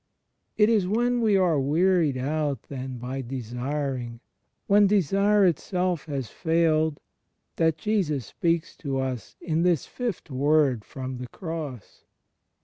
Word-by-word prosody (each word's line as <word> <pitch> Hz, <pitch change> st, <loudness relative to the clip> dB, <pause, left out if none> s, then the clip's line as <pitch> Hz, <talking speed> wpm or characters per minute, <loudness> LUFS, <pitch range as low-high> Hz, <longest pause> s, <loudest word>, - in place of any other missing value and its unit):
It 210 Hz, -, +5 dB
is 215 Hz, -5 st, +2 dB
when 240 Hz, +4 st, +1 dB
we 215 Hz, -3 st, +4 dB
are 175 Hz, -6 st, +3 dB
wearied 160 Hz, +1 st, +2 dB
out 145 Hz, -1 st, -1 dB
then 130 Hz, -2 st, -5 dB
by 130 Hz, +3 st, -4 dB
desiring, 125 Hz, 0 st, -4 dB, 0.5 s
when 205 Hz, 0 st, +5 dB
desire 200 Hz, +1 st, +3 dB
itself 180 Hz, -1 st, 0 dB
has 135 Hz, -5 st, -3 dB
failed, 160 Hz, -, +1 dB, 0.6 s
that 160 Hz, -1 st, +2 dB
Jesus 155 Hz, -, 0 dB
speaks 165 Hz, -1 st, -1 dB
to 140 Hz, -3 st, -3 dB
us 130 Hz, -3 st, -4 dB
in 160 Hz, -1 st, -1 dB
this 175 Hz, -4 st, +2 dB
Fifth 235 Hz, -, -5 dB
Word 140 Hz, -3 st, +2 dB
from 130 Hz, 0 st, -6 dB
the 125 Hz, -, -6 dB
Cross. 155 Hz, -, -7 dB
155 Hz, 130 wpm, -26 LUFS, 130-185 Hz, 0.6 s, It